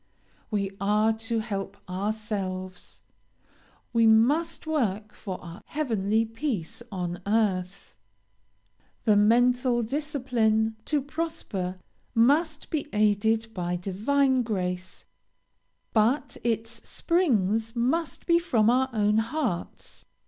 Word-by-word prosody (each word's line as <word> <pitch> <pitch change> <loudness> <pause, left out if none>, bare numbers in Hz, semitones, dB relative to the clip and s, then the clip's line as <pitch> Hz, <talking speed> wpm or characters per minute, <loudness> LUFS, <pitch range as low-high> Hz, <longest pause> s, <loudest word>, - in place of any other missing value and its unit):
We 200 -3 -1
are 210 +2 +3
to 225 +1 -2
help 200 -3 -4
ourselves 190 -1 -4 0.9
we 230 -1 +5
must 255 +12 +3
work 215 -9 -1
for 190 -4 -6
our 175 +3 -9
heavenly 225 -7 0
peace 225 - -4
on 175 -2 -4
earth 195 -3 0 1.1
the 215 - +5
mental 245 +3 +3
discipline, 240 -5 0
to 295 -3 0
prosper, 270 - -3 0.4
must 295 +6 +2
be 300 -2 -1
aided 220 +2 +2
by 180 -2 -2
divine 255 +9 +1
grace, 185 -5 -3 0.9
but 240 +4 +2
its 230 0 -2
springs 225 - +1
must 280 +8 -1
be 340 -1 +4
from 235 -10 +3
our 260 +1 +2
own 210 -1 +2
hearts. 230 - -3
225 Hz, 100 wpm, -27 LUFS, 200-255 Hz, 1.1 s, we